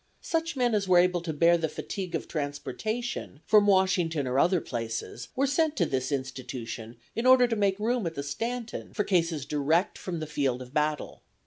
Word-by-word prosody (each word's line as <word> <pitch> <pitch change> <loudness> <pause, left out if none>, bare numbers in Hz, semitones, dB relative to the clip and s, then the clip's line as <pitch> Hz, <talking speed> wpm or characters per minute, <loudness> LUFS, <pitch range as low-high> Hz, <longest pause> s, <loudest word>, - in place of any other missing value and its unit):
Such 330 -1 -1
men 245 -3 +2
as 205 -2 +1
were 180 -1 +5
able 180 0 +4
to 170 -1 -3
bear 170 +3 +4
the 160 -1 -1
fatigue 180 +2 -5
of - - -3
transportation 160 +6 -4
from 210 -1 +5
Washington 185 -6 +2
or 130 +2 +1
other 180 +3 +4
places 115 -2 -5
were 270 - +2
sent 310 +2 +1
to 180 - +2
this 130 -1 -2
institution 125 -4 -5 0.2
in 230 +3 0
order 255 -1 +7
to 230 - -1
make 200 -2 +1
room 230 -2 0
at 165 - -5
the 140 - -3
Stanton 230 +11 -4
for 210 - +1
cases 165 -7 +1
direct 150 +5 +1
from 175 -3 -4
the 155 - -3
field 140 -4 -1
of 125 +1 -15
battle. 150 0 -1
170 Hz, 195 wpm, -28 LUFS, 145-215 Hz, 0.2 s, order